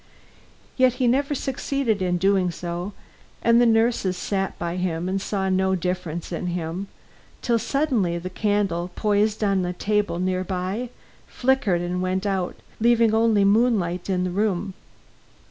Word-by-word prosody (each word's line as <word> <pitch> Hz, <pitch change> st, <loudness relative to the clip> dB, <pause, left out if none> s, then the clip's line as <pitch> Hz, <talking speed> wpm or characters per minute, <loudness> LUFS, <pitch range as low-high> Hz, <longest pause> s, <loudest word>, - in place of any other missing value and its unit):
Yet 255 Hz, -2 st, +4 dB
he 250 Hz, 0 st, -1 dB
never 280 Hz, +4 st, +1 dB
succeeded 265 Hz, -5 st, -1 dB
in 180 Hz, -1 st, +1 dB
doing 190 Hz, 0 st, +2 dB
so, 175 Hz, +3 st, -5 dB, 0.5 s
and 235 Hz, +1 st, +5 dB
the 240 Hz, -, +5 dB
nurses 225 Hz, -5 st, +2 dB
sat 195 Hz, 0 st, -2 dB
by 170 Hz, -1 st, -3 dB
and 180 Hz, +1 st, -2 dB
saw 195 Hz, -1 st, -2 dB
no 190 Hz, 0 st, +2 dB
difference 180 Hz, -2 st, -3 dB
in 175 Hz, +1 st, -3 dB
him, 175 Hz, +2 st, -3 dB, 0.6 s
till 235 Hz, -1 st, +2 dB
suddenly 240 Hz, -, 0 dB
the 180 Hz, +2 st, -6 dB
candle, 195 Hz, -4 st, 0 dB
posed 210 Hz, 0 st, +1 dB
on 195 Hz, -2 st, +2 dB
a 180 Hz, 0 st, -2 dB
table 205 Hz, -1 st, 0 dB
near 185 Hz, +1 st, 0 dB
by, 190 Hz, +6 st, -3 dB, 0.4 s
flickered 245 Hz, -9 st, +1 dB
and 180 Hz, +1 st, -2 dB
went 185 Hz, +2 st, -1 dB
out, 190 Hz, -3 st, -1 dB, 0.2 s
leaving 230 Hz, -1 st, +4 dB
only 220 Hz, -2 st, +3 dB
moonlight 200 Hz, -5 st, +2 dB
in 180 Hz, -1 st, +1 dB
the 180 Hz, -, -2 dB
room. 195 Hz, -1 st, -1 dB
195 Hz, 145 wpm, -24 LUFS, 180-225 Hz, 0.6 s, and